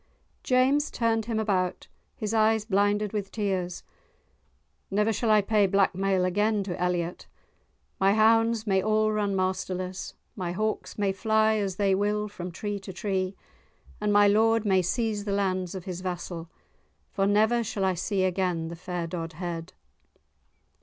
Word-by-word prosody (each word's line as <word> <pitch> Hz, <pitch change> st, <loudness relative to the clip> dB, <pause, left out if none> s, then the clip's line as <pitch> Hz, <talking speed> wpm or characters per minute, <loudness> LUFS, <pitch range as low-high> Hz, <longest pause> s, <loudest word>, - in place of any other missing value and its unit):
James 265 Hz, +4 st, +2 dB
turned 225 Hz, -2 st, 0 dB
him 225 Hz, -1 st, -1 dB
about, 190 Hz, -4 st, -1 dB, 0.3 s
his 215 Hz, 0 st, -3 dB
eyes 220 Hz, -1 st, +3 dB
blinded 205 Hz, 0 st, +1 dB
with 200 Hz, -2 st, -3 dB
tears. 190 Hz, -4 st, -2 dB, 1.1 s
"Never 210 Hz, +3 st, +1 dB
shall 225 Hz, +2 st, -1 dB
I 215 Hz, -1 st, +6 dB
pay 210 Hz, -1 st, +3 dB
blackmail 195 Hz, -1 st, +2 dB
again 205 Hz, +3 st, +1 dB
to 180 Hz, -3 st, -5 dB
Elliot. 180 Hz, -1 st, -2 dB, 0.7 s
My 195 Hz, +1 st, +4 dB
hounds 225 Hz, +1 st, +3 dB
may 190 Hz, -3 st, +2 dB
all 215 Hz, +1 st, +2 dB
run 205 Hz, -2 st, 0 dB
masterless, 185 Hz, 0 st, -3 dB, 0.2 s
my 180 Hz, -3 st, -3 dB
hawks 215 Hz, +3 st, -3 dB
may 200 Hz, -2 st, +1 dB
fly 220 Hz, +2 st, +2 dB
as 195 Hz, -3 st, -2 dB
they 195 Hz, 0 st, +2 dB
will 210 Hz, +2 st, 0 dB
from 185 Hz, -4 st, -7 dB
tree 205 Hz, +3 st, -4 dB
to 190 Hz, 0 st, -8 dB
tree, 190 Hz, 0 st, -2 dB, 0.7 s
and 210 Hz, 0 st, +1 dB
my 205 Hz, 0 st, +6 dB
lord 225 Hz, +2 st, +3 dB
may 190 Hz, -2 st, +3 dB
seize 210 Hz, +2 st, -1 dB
the 200 Hz, -, -1 dB
lands 185 Hz, -2 st, -1 dB
of 185 Hz, -, -7 dB
his 180 Hz, -1 st, -5 dB
vassal, 175 Hz, -2 st, -5 dB, 0.6 s
for 195 Hz, -2 st, +1 dB
never 220 Hz, +4 st, +3 dB
shall 200 Hz, -2 st, -2 dB
I 190 Hz, -, +2 dB
see 190 Hz, +2 st, -1 dB
again 180 Hz, -3 st, 0 dB
the 170 Hz, -, -6 dB
fair 175 Hz, 0 st, -4 dB
Dodhead." 165 Hz, 0 st, -5 dB
200 Hz, 155 wpm, -27 LUFS, 185-215 Hz, 1.1 s, I